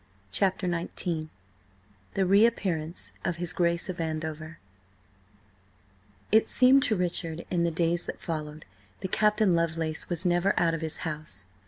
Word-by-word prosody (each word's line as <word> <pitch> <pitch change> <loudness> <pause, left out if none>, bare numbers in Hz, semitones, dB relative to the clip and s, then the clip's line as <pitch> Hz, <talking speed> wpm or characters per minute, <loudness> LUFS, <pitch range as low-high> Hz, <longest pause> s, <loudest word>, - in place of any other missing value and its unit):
CHAPTER 190 - +1
XIX 170 -2 -2 0.9
THE 195 - +2
REAPPEARANCE 190 -5 +1
OF 180 - -1
HIS 175 0 -1
GRACE 170 0 +1
OF 185 -2 -5
ANDOVER 155 0 -4 1.7
IT 220 +1 +5
seemed 260 +2 +5
to 220 - +2
Richard 170 -2 -2
in 175 -2 +1
the 170 - +2
days 170 +1 0
that - - -5
followed, 155 -2 -5 0.4
that 190 - -4
Captain 210 -2 +3
Lovelace 165 -2 0
was 175 -1 -3
never 175 +2 +2
out 165 -1 +2
of 165 - -3
his 160 -1 -1
house. 150 - -4
170 Hz, 140 wpm, -28 LUFS, 160-185 Hz, 1.7 s, IT